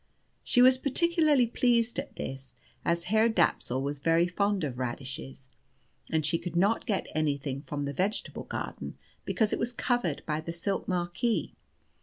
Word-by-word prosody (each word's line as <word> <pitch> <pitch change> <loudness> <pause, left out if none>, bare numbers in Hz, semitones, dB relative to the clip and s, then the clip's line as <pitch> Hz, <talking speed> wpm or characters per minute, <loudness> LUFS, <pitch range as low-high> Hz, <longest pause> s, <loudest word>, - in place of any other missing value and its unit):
She 245 - +4
was 255 0 +6
particularly 305 -1 +3
pleased 235 0 +2
at - - -6
this, 135 0 -6 0.3
as 170 0 +1
Herr 220 +5 +3
Dapsul 155 - +1
was 140 +1 -3
very 165 +3 +3
fond 200 +1 0
of 130 -4 -3
radishes, 130 +1 -5 0.6
and 160 -2 +1
she 165 +2 +2
could 175 -1 -6
not 200 +8 +2
get 205 -4 0
anything 140 -3 -1
from 145 0 -4
the 140 - -3
vegetable 195 - -2
garden - - -5 0.3
because 220 -2 +1
it - - -1
was 235 - 0
covered 240 - -1
by 155 0 -1
the 165 +1 -5
silk 190 +4 -2
marquee. 180 +5 -1
175 Hz, 160 wpm, -29 LUFS, 145-230 Hz, 0.6 s, was